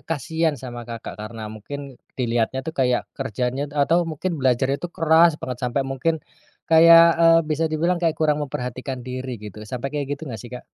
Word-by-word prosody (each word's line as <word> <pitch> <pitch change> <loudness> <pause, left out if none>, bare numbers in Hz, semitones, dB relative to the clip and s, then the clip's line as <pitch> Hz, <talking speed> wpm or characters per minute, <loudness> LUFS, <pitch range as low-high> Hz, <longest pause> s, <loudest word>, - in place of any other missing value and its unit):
kasihan 160 0 -1
sama, 120 -2 -8
Kakak, 115 -5 -7
karena 110 0 -7
mungkin 135 +5 -8 0.2
dilihatnya 120 +1 -1
tuh 160 - -4
kayak 125 -4 +1
kerjanya 130 +2 -3
atau 160 +4 +1
mungkin 160 +1 -3
belajarnya 130 +2 +1
tuh 175 - -4
keras 165 0 +5
banget 125 -2 -5
sampai 125 +1 0
mungkin 135 +5 -1 0.5
kayak, 165 +1 +8 0.2
eee, 165 0 +7
bisa 155 +1 -1
dibilang 170 +3 0
kayak 165 -2 +1
kurang 150 -1 +1
memperhatikan 130 -2 -5
diri 130 0 -5
gitu, 105 -1 -10
sampai 125 +3 -4
kayak 145 -2 -2
gitu 140 - -21
nggak 120 -7 -7
sih, 120 - -10
Kak? 125 0 -9
135 Hz, 180 wpm, -23 LUFS, 125-160 Hz, 0.5 s, kayak